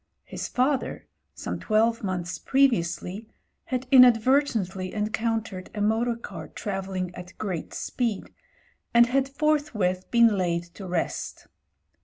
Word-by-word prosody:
His - - -6
father, 260 +1 0 0.3
some - - -5
twelve 225 +1 +1
months 180 -3 -3
previously, 215 -5 +1 0.4
had 255 0 -2
inadvertently 235 -7 +4
encoun 220 +1 -1
tered 185 -4 -8
a 210 - -2
motor 225 +3 +1
car 230 - -8
travelling 190 -3 -4
at 180 +1 -11
great 185 -6 -4
speed, 230 -6 -2 0.6
and 235 0 +8
had 265 +2 +1
forthwith 275 -12 0
been 230 -4 +4
laid 170 -2 0
to 195 0 -8
rest. 175 -2 -3
220 Hz, 120 wpm, -26 LUFS, 185-245 Hz, 0.6 s, and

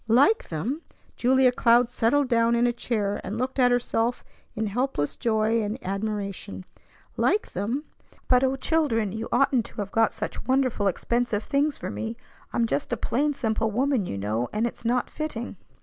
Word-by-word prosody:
"Like 275 - +4
them!" 225 - -3 0.3
Julia 255 +1 +4
Cloud 240 0 +4
settled 255 +4 +2
down 235 -1 +3
in 235 +1 +3
a 240 - +2
chair, 210 -4 -2
and 205 +4 -4
looked 260 +3 -2
at 250 -1 +6
herself 245 -1 0 0.3
in 220 - -1
helpless 215 - -1
joy 220 0 +1
and 210 +2 -2
admiration. 200 -1 -4 0.5
Like 425 - +1
them! 225 +10 -2 0.4
"But 250 0 +4
O 265 0 +2
children! 270 - +1
You 220 +2 -4
oughtn't 250 -2 +3
to - - -18
have 200 -1 -4
got 225 0 +3
such - - -5
wonderful, 255 -6 +2
expensive 235 +2 0
things 285 +1 0
for - - -5
me. 225 +1 -4 0.3
I'm 235 - +1
just 145 -10 -2
a - - 0
plain, 290 +4 0
simple 225 -3 0
woman, 250 -2 +1
you 100 - -4
know, 110 +5 -1
and 215 +2 0
it's 235 - -5
not 245 +2 +1
fitting." 245 -8 -5
235 Hz, 175 wpm, -26 LUFS, 215-255 Hz, 0.5 s, at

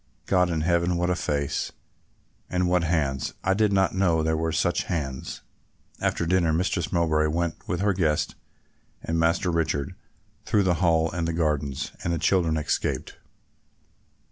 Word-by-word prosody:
God 90 -2 +3
in 80 -2 -1
heaven, 85 +1 +1
what 90 +1 +1
a - - +1
face, 70 -4 -2 0.8
and 90 0 +1
what 90 -1 +2
hands! 75 -5 -1
I 95 - +3
did 105 +1 +2
not 95 -1 +2
know 85 -4 +2
there 80 0 +1
were 80 +1 -1
such 85 +2 0
hands." 70 -7 -4 0.6
After - - 0
dinner 85 -1 +2
Mistress 85 +1 0
Mowbray 80 -3 +2
went 85 +1 -2
with 90 0 -1
her 100 0 +2
guest 80 -5 0 0.7
and 80 0 -1
Master 85 +3 +2
Richard 80 -4 -1 0.5
through 110 -2 +2
the 90 -2 +1
Hall 80 -2 +3
and 85 -1 -2
the 85 - -1
gardens, 75 -4 -1
and 85 - -1
the 85 - 0
children 85 -1 +2
escaped. 75 - -2
85 Hz, 160 wpm, -25 LUFS, 80-90 Hz, 0.8 s, God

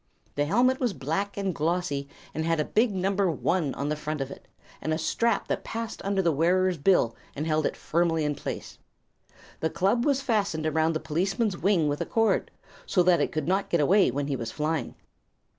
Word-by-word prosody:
The 145 - 0
helmet 250 - +3
was 245 -6 0
black 190 +9 -3
and 195 -2 -1
glossy 160 -3 -1 0.2
and 160 - -2
had 165 0 +1
a 150 - +1
big 225 +1 +2
number 195 0 +1
"1" 165 -2 0
on 140 +1 -2
the 150 - 0
front 150 0 -4
of 135 0 -3
it, - - -11 0.3
and 155 - -2
a 155 - +1
strap 215 +7 0
that - - -2
passed 230 -1 -5
under 195 -1 0
the 170 - +3
wearer's 175 +3 +2
bill 140 -7 +3 0.2
and 150 - -3
held 155 -1 +1
it - - -5
firmly 165 -1 +1
in 150 - 0
place. 145 - -6 0.8
The 160 - 0
club 195 +8 +1
was 280 -1 +2
fastened 200 - 0
around 160 +1 +2
the 155 - -1
policeman's 195 +7 0
wing 180 -5 +2
with 145 0 -1
a - - -2
cord, 225 -1 +1 0.4
so 180 - +3
that 175 -1 +4
it - - 0
could 155 -1 -2
not 195 +2 +1
get 170 - +2
away 185 +5 +4
when 140 +3 -2
he 140 -1 -1
was 115 -3 -4
flying. 155 +3 -2
170 Hz, 210 wpm, -27 LUFS, 150-195 Hz, 0.8 s, that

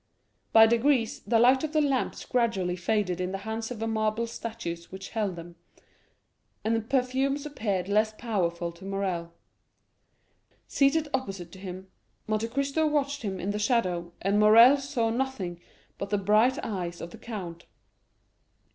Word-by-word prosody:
By 225 0 +8
degrees, 235 +1 +2
the 230 +1 +3
light 255 +4 +5
of 310 0 -3
the 310 - +3
lamps 275 -4 0
gradually 210 -8 0
faded 185 -1 -1
in 180 0 -2
the 195 - -2
hands 220 0 -3
of 245 - -6
the 225 - -3
marble 220 +1 0
statues 225 -7 -6
which 190 +1 -8
held 210 -5 -2
them, 170 0 -10 1.1
and 225 +1 +1
the 225 - 0
perfumes 270 +4 0
appeared 205 -11 -2
less 215 +2 +2
powerful 175 -7 -1
to 170 +2 -16
Morrel. 190 -4 -3 1.4
Seated 295 +3 +2
opposite 195 -10 -3
to 190 - -12
him, 185 0 -7 0.4
Monte 215 +1 -1
Cristo 275 +5 0
watched 285 -1 0
him 195 -4 -4
in 195 +3 -2
the 210 - -3
shadow, 185 -7 0
and 200 +2 +2
Morrel 230 +6 +8
saw 265 -5 -1
nothing 225 -9 -3 0.4
but 200 - -4
the 205 - +1
bright 215 +6 +3
eyes 175 -5 -4
of 170 - -7
the - - -12
count. 180 -7 -7
220 Hz, 155 wpm, -28 LUFS, 185-250 Hz, 1.4 s, By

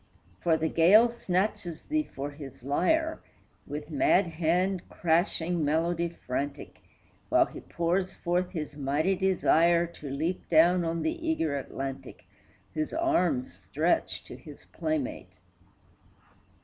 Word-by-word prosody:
For 165 -2 +3
the 160 0 0
gale 195 +9 +6
snatches 185 -6 -2
thee 305 0 -1
for 140 +2 -4
his 140 -4 -11
lyre, 315 - +1 0.5
With 150 +2 -6
mad 180 +6 +3
hand 175 +3 0
crashing 170 0 +1
melody 170 +3 +1
frantic, 140 -3 -5 0.5
While - - +5
he - - -10
pours 180 +3 -1
forth 180 +1 -1
his 155 -5 -5
mighty 145 +6 0
desire 175 -2 +3
To 165 -4 -9
leap 160 +7 -3
down 175 +2 +5
on 165 0 -2
the 325 +1 -2
eager 165 - 0
Atlantic, 135 0 -6 0.5
Whose 310 0 -2
arms 325 -6 +1
stretch - - -1
to - - -10
his - - -13
playmate. 310 -3 -3
170 Hz, 125 wpm, -28 LUFS, 155-190 Hz, 0.5 s, gale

